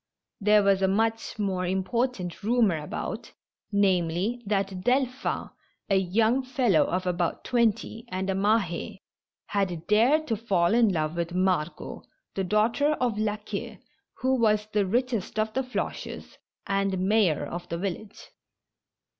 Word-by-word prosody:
There 210 0 +4
was 195 -1 +3
a 190 - +4
much 225 +4 0
more 190 -3 -1
import 215 +7 0
ant 175 -1 -6
rumor 215 -6 +2
about, 150 - -5 0.4
namely, 195 +3 +1
that 195 -2 -1
Delphin, 255 +2 0 0.4
a - - +5
young 220 +7 +2
fellow 255 - +2
of 180 +1 -2
about 175 -1 -1
twenty, 230 -1 0
and 185 +1 -3
a 195 - +1
Mah^, 200 -1 0 0.5
had 180 -5 -2
dared 250 +9 +4
to 230 - 0
fall 195 -5 +1
in 230 -3 +4
love 155 -2 -1
with 170 +1 -3
Margot, 180 -3 -1 0.3
the 195 - -1
daughter 225 +10 +2
of 245 -7 -1
La 215 -1 0
Queue, 210 - -6 0.4
who 260 +1 +2
was 215 -2 +3
the 205 -2 +2
richest 235 -1 -1
of 215 0 0
the 265 - +1
Floches, 255 -1 -5 0.3
and 195 -1 0
mayor 205 -7 +3
of 175 0 -7
the 170 - -2
village. 200 +3 -6
205 Hz, 145 wpm, -27 LUFS, 185-230 Hz, 0.5 s, a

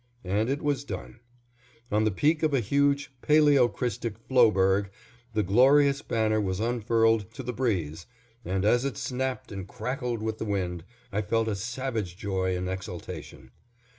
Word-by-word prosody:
_" - - -40 0.2
and 100 +5 0
it 140 +2 -2
was 145 -2 0
done; 120 -4 -7 0.7
on 105 +1 +2
the - - +4
peak 150 - +1
of 155 -3 +2
a - - +3
huge 140 +4 +1
paleocrystic 125 -7 +2
floeberg 100 -6 +4 0.5
the 105 - +2
glorious 135 +8 +4
banner 110 -3 +1
was 95 -2 -2
unfurled 115 -2 +1
to - - -8
the 125 - -4
breeze, 85 - -2 0.4
and 95 +2 -1
as 120 +3 +3
it 140 -1 -3
snapped 130 0 -3
and 95 -2 -6
crackled 125 -1 -3
with 110 0 -3
the - - -2
wind, 90 -5 -2 0.3
I 105 - 0
felt 115 +2 0
a 110 - 0
savage 115 -4 -4
joy 95 -2 -1
and 90 0 -3
exultation. 95 -8 -7
110 Hz, 160 wpm, -27 LUFS, 95-130 Hz, 0.7 s, the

